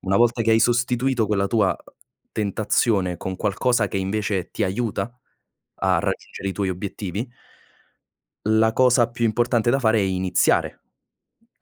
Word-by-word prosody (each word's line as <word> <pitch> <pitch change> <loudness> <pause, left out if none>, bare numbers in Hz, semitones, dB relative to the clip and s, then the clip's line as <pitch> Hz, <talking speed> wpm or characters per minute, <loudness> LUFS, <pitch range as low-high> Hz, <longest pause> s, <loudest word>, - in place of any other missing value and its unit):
Una 95 +1 0
volta 120 0 +3
che 115 - +1
hai 110 0 +4
sostituito 120 0 +1
quella 100 -2 +1
tua, 105 -3 +2
uh, - - -16 0.4
tentazione 105 -3 0
con 95 +2 -5
qualcosa 105 +2 +1
che 95 - -4
invece 95 -1 -2
ti - - -1
aiuta 120 +4 -3 0.6
a - - +2
raggiungere 95 - -4
i - - -2
tuoi 100 -1 -2
obiettivi 100 +4 -5 1.2
la 110 +1 +3
cosa 125 -2 +4
più 120 0 -3
importante 120 +1 +1
da 135 - +2
fare 110 -3 +2
è - - +2
iniziare 95 -1 +1 0.8
a - - -60
110 Hz, 150 wpm, -23 LUFS, 95-120 Hz, 1.2 s, hai